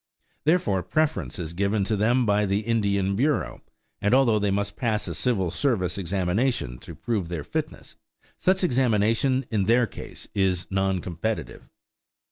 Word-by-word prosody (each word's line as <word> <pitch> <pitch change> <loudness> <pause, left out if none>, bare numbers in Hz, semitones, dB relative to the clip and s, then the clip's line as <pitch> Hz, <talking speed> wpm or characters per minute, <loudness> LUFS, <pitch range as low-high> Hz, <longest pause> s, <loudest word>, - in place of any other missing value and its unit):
Therefore 150 - +2
preference 155 - -1
is 85 -2 -5
given 100 +3 +1
them 110 +5 +2
by 105 0 +2
the 100 +2 +1
Indian 100 -4 +1
Bureau, 125 - 0 0.4
and 105 +5 +3
although 120 -5 +4
they 100 0 +1
must 100 +1 -1
pass 110 -5 -1
a 85 - -3
civil 95 -2 0
service 90 -6 0
examination 95 - -1
to - - -10
prove 105 -8 -2
their 85 -4 -4
fitness, - - -5 0.4
such 190 +1 +1
examination, 125 - +2
in 105 -3 +1
their 120 +3 +4
case, - - -10
is 95 -2 +1
non 95 -1 +1
competitive. 95 +6 -4
105 Hz, 145 wpm, -25 LUFS, 95-120 Hz, 0.4 s, although